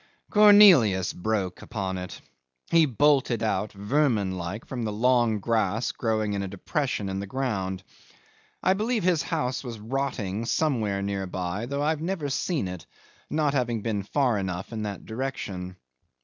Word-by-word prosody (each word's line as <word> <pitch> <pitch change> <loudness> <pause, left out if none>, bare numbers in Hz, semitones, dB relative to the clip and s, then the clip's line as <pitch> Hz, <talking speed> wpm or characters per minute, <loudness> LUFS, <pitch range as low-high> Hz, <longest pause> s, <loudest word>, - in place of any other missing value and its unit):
'Cornelius 190 - +7
broke 95 -2 -2
upon 95 -4 -4
it. 90 0 -8 0.5
He 165 -2 +5
bolted 135 -2 +2
out, 105 -1 0
vermin 105 -2 0
like, 90 +5 -5
from 125 -2 -5
the 110 -2 -2
long 120 0 +2
grass 110 +1 0
growing 110 -3 -1
in 100 - -1
a 100 - -3
depression 105 +3 -2
of 95 0 -3
the 100 - -5
ground. 95 -6 -2 0.8
I 185 - +4
believe 220 +2 -1
his 175 -4 +3
house 125 +2 -2
was 120 -3 -6
rotting 115 -3 -3
somewhere 110 -9 0
near 100 -1 -2
by, 90 +5 -3
though 140 +2 -2
I've 155 0 0
never 165 -4 -2
seen 140 - -1
it, 90 -3 -8 0.4
not 150 -2 +1
having 120 -5 -1
been 110 -3 -1
far 120 +1 +1
enough 95 +2 -4
in 110 - -3
that 100 -3 -5
direction. 100 -7 -5
110 Hz, 155 wpm, -26 LUFS, 100-140 Hz, 0.8 s, Cornelius